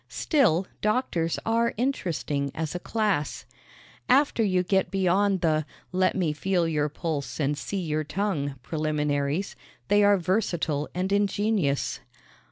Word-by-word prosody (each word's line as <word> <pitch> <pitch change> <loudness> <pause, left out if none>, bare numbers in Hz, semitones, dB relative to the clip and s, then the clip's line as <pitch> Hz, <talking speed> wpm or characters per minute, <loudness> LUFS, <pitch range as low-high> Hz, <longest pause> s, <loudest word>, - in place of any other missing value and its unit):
Still, 215 - +2 0.2
doctors 210 -7 0
are 230 +1 +1
interesting 170 - -1
as 160 -2 -3
a 180 - -3
class. 180 - -1 0.6
After 270 -3 +4
you 185 -3 +2
get 190 +1 +1
beyond 195 +1 +2
the 155 -2 +2 0.3
let 185 +1 +2
me 175 -6 0
feel 175 +1 0
your 150 -2 0
pulse 155 -2 -4
and 145 0 +1
see 195 +6 -4
your 155 -2 -1
tongue 155 -5 -2
preliminaries 150 +2 -1 0.3
they 205 +1 +5
are 205 0 +5
versatile 170 -5 -1
and 185 +2 -1
ingenious. 200 -7 +1
180 Hz, 130 wpm, -26 LUFS, 150-205 Hz, 0.6 s, they